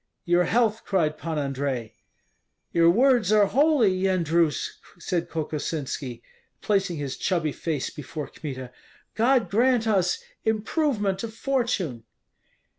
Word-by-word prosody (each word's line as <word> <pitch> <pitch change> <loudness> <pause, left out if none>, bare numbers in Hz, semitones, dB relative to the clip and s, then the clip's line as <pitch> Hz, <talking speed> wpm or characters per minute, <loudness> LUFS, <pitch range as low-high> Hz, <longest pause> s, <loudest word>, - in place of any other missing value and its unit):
"Your 175 0 +3
health!" 225 +3 +1
cried 160 -6 +1
Pan 160 0 -4
Andrei. 135 -5 -2 0.8
"Your 170 0 +5
words 240 0 +4
are 210 -1 +6
holy, 275 -2 +3
Yendrus," 170 -4 +1 0.2
said 175 -1 -2
Kokosinski, 145 -5 -4 0.4
placing 195 -4 0
his 140 -2 -4
chubby 165 -5 0
face 150 -2 -3
before 150 +1 -6
Kmita. 130 -4 -7 0.4
"God 240 +2 +3
grant 240 +2 +3
us 195 - +2 0.3
improvement 220 - 0
of 220 -1 -6
fortune!" 225 - -1
180 Hz, 115 wpm, -25 LUFS, 150-220 Hz, 0.8 s, are